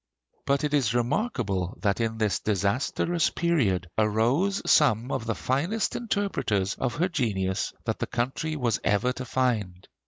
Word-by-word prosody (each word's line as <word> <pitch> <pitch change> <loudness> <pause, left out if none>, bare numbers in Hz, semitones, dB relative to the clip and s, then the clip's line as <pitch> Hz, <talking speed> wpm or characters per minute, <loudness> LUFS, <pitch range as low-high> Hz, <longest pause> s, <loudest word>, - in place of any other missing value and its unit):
But 140 +1 +2
it 150 0 -1
is 125 -6 +2
remarkable 120 - -1
that 100 +1 0
in 110 -1 -1
this 110 -2 +1
disastrous 115 - 0
period 120 - +1
arose 120 - +2
some 125 -4 +3
of 115 - -2
the 115 - 0
finest 165 - -1
interpreters 195 - -1
of 130 -3 -2
her 170 +4 +1
genius 105 - -1
that - - -2
the - - -2
country 135 +6 -2
was 120 -6 0
ever 125 +5 +2
to 130 0 -6
find. 110 -8 -1
120 Hz, 150 wpm, -27 LUFS, 105-150 Hz, -, some